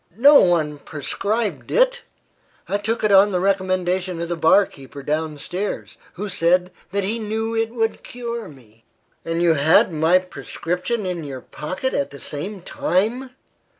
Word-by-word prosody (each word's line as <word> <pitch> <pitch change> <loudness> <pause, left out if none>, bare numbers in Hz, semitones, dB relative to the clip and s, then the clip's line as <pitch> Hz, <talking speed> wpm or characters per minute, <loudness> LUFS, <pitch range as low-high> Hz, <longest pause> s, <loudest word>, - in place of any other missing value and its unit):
"No 280 +4 +8
one 155 -5 +2
prescribed 205 - -3
it. - - +3 0.7
I 200 - 0
took 220 +3 -2
it 215 - +3
on 200 +1 +6
the 180 - +1
recommendation 185 -2 0
of 170 0 -3
the 175 - -1
bar 165 +5 +5
keeper 140 -2 -12
down 155 +1 -2
stairs, 185 +7 -4 0.2
who 205 +4 -5
said 180 0 +2 0.2
that 200 +1 0
he 220 +4 -1
knew 220 +1 -2
it 225 0 +1
would 225 -1 -1
cure 235 -3 -6
me." 115 -6 -18 0.4
"And 165 +1 -1
you 170 -1 +5
had 160 +3 +4
my 160 +3 +4
prescription 185 +3 -3
in 180 -3 -3
your 135 -3 -6
pocket 185 +12 -4
at 140 - 0
the 140 - -11
same 185 +8 -5
time! 225 +12 -1
185 Hz, 160 wpm, -22 LUFS, 160-215 Hz, 0.7 s, No